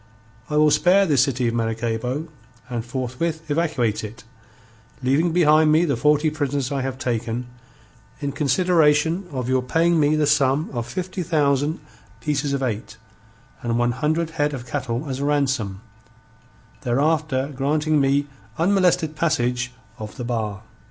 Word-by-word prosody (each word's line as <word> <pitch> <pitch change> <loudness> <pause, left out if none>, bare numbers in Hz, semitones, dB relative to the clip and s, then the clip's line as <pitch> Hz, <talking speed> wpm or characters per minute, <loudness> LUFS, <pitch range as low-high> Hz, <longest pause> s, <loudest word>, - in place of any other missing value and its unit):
I 150 - 0
will 150 0 +5
spare 180 +6 +4
this 145 -8 +3
city 130 -2 +1
of 115 - 0
Maracaybo 115 +5 -2 0.4
and 120 -2 -2
forthwith 135 +6 -3
evacuate 135 -10 0
it, 105 +1 -8 0.8
leaving 145 +7 +2
behind 155 -2 +4
me 160 +3 +4
the 145 - 0
forty 150 +1 +2
prisoners 145 -3 -2
I 140 -1 -1
have 130 0 -3
taken, 120 -1 -2 0.7
in 140 -2 -2
consideration 160 +3 +2
of 130 -3 -3
your 130 0 +2
paying 165 +6 +2
me 150 0 +3
the 155 -1 +2
sum 145 0 +2
of 120 -2 -3
fifty 185 +7 -4
thousand 150 -2 +1 0.4
pieces 145 +2 -1
of 140 -1 -1
eight 110 -4 -4 0.6
and 120 -1 -1
one 120 0 +2
hundred 155 +6 -1
head 150 -2 0
of 125 -2 -8
cattle 120 +3 -3
as 135 -1 -4
a 140 - -1
ransom, 130 -9 0 1.0
thereafter 140 +1 0
granting 150 +2 +1
me 140 +1 +2 0.3
unmolested 180 -3 +2
passage 125 -6 0 0.3
of 110 +2 -8
the 125 - -4
bar. 110 -5 -3
140 Hz, 145 wpm, -22 LUFS, 125-155 Hz, 1.0 s, will